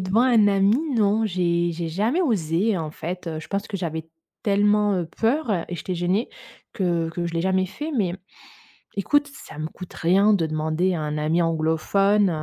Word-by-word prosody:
devant 185 +5 +2
un 235 -5 +5
ami, 200 +2 +3 0.2
non. 215 0 +2
J'ai 175 -3 0
j'ai 165 0 -4
jamais 215 - 0
osé. 200 - +1
En 160 -3 -3
fait, 180 +3 -6
heu, 160 -1 -4
je - - -12
pense 200 0 -2
que 200 - -3
j'avais 160 -3 -4 0.3
tellement, 205 0 +3
heu, 175 -3 -1
peur, 245 +3 +1
heu 175 -5 0
et 175 - -4
j'étais 185 +3 -4
gênée 180 +6 0 0.4
que 170 -3 0
que 170 +1 -3
je 170 - -5
l'ai 165 - 0
jamais 190 +1 +1
fait. 295 - -6
Mais, 185 -5 0 0.8
écoute, 290 +9 +2
ça 210 - -12
me 155 - -2
coûte 180 +2 -11
rien 195 +5 +3
de 180 -5 +2
demander 155 +4 0
à 160 - -2
un 150 0 -3
ami 155 +3 +1
anglophone, 170 +5 +2
185 Hz, 195 wpm, -23 LUFS, 165-205 Hz, 0.8 s, un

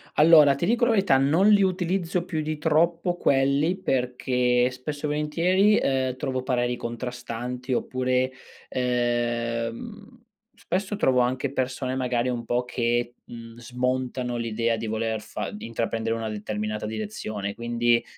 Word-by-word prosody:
Allora, 150 -2 +7
ti 140 - -1
dico 240 +3 +2
la 240 - +3
verità: 195 -11 +4
non 155 +9 +3
li 205 -1 +6
utilizzo 180 -1 0
più 160 -4 -2
di 155 0 -3
troppo 165 +3 +1
quelli 140 +5 +2
perché, 125 -4 +1
spesso 145 +4 -5
e - - -1
volentieri, 175 +8 +2
ehm, 130 -1 0
trovo 130 -1 -3
pareri 125 -2 0
contrastanti 125 +1 -5
oppure, 130 +1 0 0.4
ehm, 120 - -2 0.4
spesso 205 -2 -2
trovo 130 -10 +2
anche 130 +2 0
persone 130 0 -2
magari 125 -1 0
un 120 -2 -3
po' 120 +2 0
che, 120 0 -1
mhmm, 115 -1 -10
smontano 125 0 -2
l'idea 115 0 0
di 110 - -4
voler 110 0 -2
fa - - -5
di 210 - -8
intraprendere 115 0 -2
una 115 -1 -3
determinata 105 0 -4
direzione, 105 -1 -4
quindi, 120 0 +1
125 Hz, 140 wpm, -25 LUFS, 120-150 Hz, 0.4 s, Allora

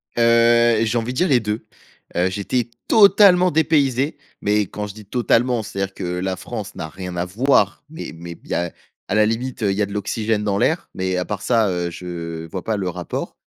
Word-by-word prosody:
Heu, 115 -1 +4
j'ai 115 +2 0
envie 115 +2 -2
de 130 - -7
dire 180 - +3
les 130 -7 +4
2. 105 0 -3 0.5
Heu, 90 +2 +2
j'étais 105 +5 -2 0.2
totalement 200 -4 +6
dépaysé, 145 -3 +2 0.2
mais 105 +1 +2
quand 105 +1 -4
je 100 - -8
dis 105 -1 -12
totalement, 120 +1 +1
c'est-à-dire 95 -1 -4
que - - -7
la 90 +1 -2
France 105 +2 -7
n'a 80 - -5
rien 90 +2 -7
à 85 - 0
voir, 105 +1 +2
mais 160 +2 -7
mais 85 0 -9
il - - -18
y - - -2
a 85 -1 -1 0.4
à - - 0
la 110 0 +5
limite, 115 +2 -2
heu, 100 - +2
il 95 - -2
y 105 - +1
a - - +3
de 100 - -9
l'oxygène 105 +1 -1
dans 100 -2 0
l'air, - - 0
mais 95 0 -1
à 90 - -1
part 105 -2 -4
ça, 115 -4 +2
heu, 90 -1 -1
je 85 -2 -6
vois 90 +3 -6
pas 110 -1 -1
le 95 -2 -2
rapport. 90 0 -5
105 Hz, 220 wpm, -21 LUFS, 95-120 Hz, 0.5 s, totalement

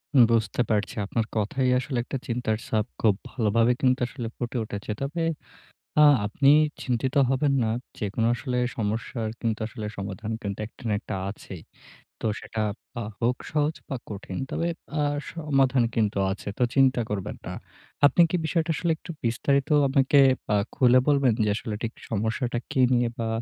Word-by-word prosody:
হুম, 125 - +9
বুঝতে 115 +1 +1
পারছি। 105 -3 0
আপনার 110 +2 -1
কথাই 125 +5 +1
আসলে 130 0 -3
একটা 135 - -4
চিন্তার 115 -3 -1
ছাপ, 110 -1 +1 0.2
খুব 105 -3 +4
ভালোভাবে 115 0 +2
কিন্তু 130 -1 +3
আসলে 120 -2 -6
ফুটে 120 +1 -3
উঠেছে। 105 0 -5
তবে 150 +5 -2 0.8
আ - - +9 0.2
আপনি 135 +7 +3 0.3
চিন্তিত 125 +1 -1
হবেন 140 +2 +2
না। 110 - 0 0.3
যেকোনো 110 +2 0
আসলে 125 0 -3 0.2
সমস্যার 110 +1 -2
কিন্তু 115 -2 -1
আসলে 110 -1 -7
সমাধান 100 +2 -5
কিন্তু, 100 -3 -4
একটা 115 - -17
না - - +2
একটা - - -5
আছেই। 95 -3 -9 0.6
তো - - -2
সেটা 110 - -5 0.4
আ - - -2 0.2
হোক 120 +1 +2
সহজ 150 +1 +1
বা 135 - -2
কঠিন। 100 -2 -6
তবে 170 - -1 0.3
আ - - +2 0.3
সমাধান 135 -6 +2
কিন্তু 105 -3 +1
আছে। 100 - -7
তো - - 0
চিন্তা 135 -2 +4
করবেন 100 -3 -3
না। - - -4 0.5
আপনি 145 - +3
কি 180 - +2
বিষয়টা 165 0 0
আসলে 170 -2 0
একটু 165 - -11
বিস্তারিত 135 +4 +1 0.2
আমাকে 135 +1 +3 0.4
আ - - +4 0.2
খুলে 130 -2 +5
বলবেন, 140 -4 +4
যে, - - +1
আসলে 115 -1 -4
ঠিক 115 -1 -2 0.2
সমস্যাটা 115 +3 -1
কী 130 - +1
নিয়ে 120 -1 +3
বা 115 -1 -1
120 Hz, 165 wpm, -26 LUFS, 110-135 Hz, 0.8 s, হুম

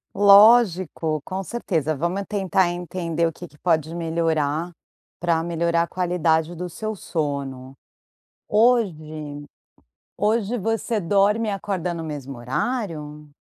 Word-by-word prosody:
Lógico, 200 -6 +5
com 190 +2 -4
certeza, 165 - -2
vamos 175 +7 -2
tentar 190 -3 +1
entender 170 -1 -2
o 165 - -4
que 175 - -10
que 150 - -22
pode 160 -1 0
melhora, 165 -1 -1 0.5
para 165 -1 +1
melhorar 170 0 +1
a - - -5
qualidade 175 -2 0
do 180 +2 -5
seu 215 +5 -5
sono. 140 -7 -4 0.7
Hoje 155 -11 +1 0.7
hoje 220 +2 +1
você 225 +2 -1
dorme 205 +5 +2
e - - +1
acorda 190 -3 -2
no 170 -1 -5
mesmo 140 -4 -6
horário? 150 - -3
170 Hz, 120 wpm, -23 LUFS, 155-200 Hz, 0.7 s, Lógico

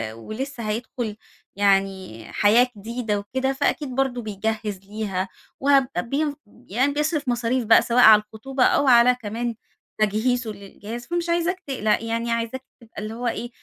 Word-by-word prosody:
ولسه 230 - -5
هيدخل 225 -1 -3 0.4
يعني 195 - 0
حياة 230 +5 +5
جديدة 220 -1 -2
وكده، 260 +6 -2
فأكيد 280 -1 -1
برضه 265 -2 0
بيجَهّز 210 -1 -3
ليها 195 -3 -3 0.3
وهب 275 -1 +4 0.8
يعني 260 +8 +1
بيصرف 300 -1 -1
مصاريف 240 0 0
بقى 225 - +7
سواء 240 +1 +1
على 215 -1 +9
الخطوبة 250 +5 -3
أو 285 - +3
على 245 0 +6
كمان 230 +2 -3 0.5
تجهيزه 220 +2 +1
للجهاز، 210 +4 -9
فمش 345 0 -2
عايزاك 345 +2 0
تقلق 215 -5 0
يعني 230 +1 -2
عايزاك 230 +3 -2 0.2
تبقى 225 -2 -10
اللي 215 +1 -5
هو 240 +1 -3
إيه 235 +1 -3
230 Hz, 140 wpm, -23 LUFS, 210-260 Hz, 0.8 s, على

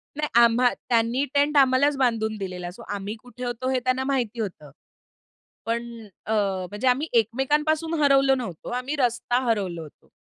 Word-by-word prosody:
नाही, 300 +1 -1 0.2
आम्हा 235 +2 +4 0.2
त्यांनी 235 +2 +2
टेंट 290 +1 +2
आम्हालाच 275 +1 +4
बांधून 225 -4 0
दिलेला. 180 -3 -5
सो 200 - -14
आम्ही 200 +2 -5
कुठे 250 0 -10
होतो 245 +1 -3
हे 260 -1 +1
त्यांना 255 +1 0
माहिती 250 -4 -1
होतं. 175 -9 -5 0.9
पण 235 +1 -2 0.4
अ, - - -4 0.4
म्हणजे 210 +6 -3
आम्ही 260 +5 +2
एकमेकांपासून 300 +8 0
हरवलो 275 -1 +4
नव्हतो, 210 -11 -6
आम्ही 250 +4 -3
रस्ता 245 -2 0
हरवलो 195 -7 -1
होतो. 155 -2 -14
245 Hz, 155 wpm, -24 LUFS, 220-270 Hz, 0.9 s, आम्हा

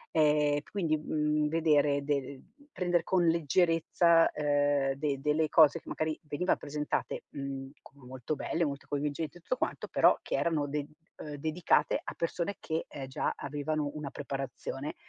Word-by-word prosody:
Ehm, 150 -1 +4
quindi, 170 -6 +1
mhmm, 150 0 0
vedere 150 -3 +2
de 145 +1 +1
ehm, 135 0 -9 0.2
prender 175 -5 +1
con 180 0 +2
leggerezza, 165 +1 +3
ehm, 145 -2 +1
de 140 -1 -2
delle 150 +2 +1
cose 160 0 +6
che - - -25
magari 155 0 -2
veniva 155 +5 0
presentate, 150 +1 -3
mhmm, 135 -1 -6 0.2
molto 130 +1 -5
belle, 170 - -1
molto 140 -1 -4
coinvolgenti 145 +2 -3
e - - -15
tutto 255 - -2
quanto, - - -2
però, - - +5
che - - -3
erano 155 -4 0
de 145 0 -2 0.3
uhm, 150 - -7
dedicate 160 +4 +1
a - - -6
persone 170 +3 -2
che, 160 +1 -3
ehm, 135 -2 -7
già 130 - -1
avevano 150 0 -2
una 150 -2 -5
preparazione. 135 0 -5
150 Hz, 155 wpm, -30 LUFS, 140-160 Hz, 0.3 s, cose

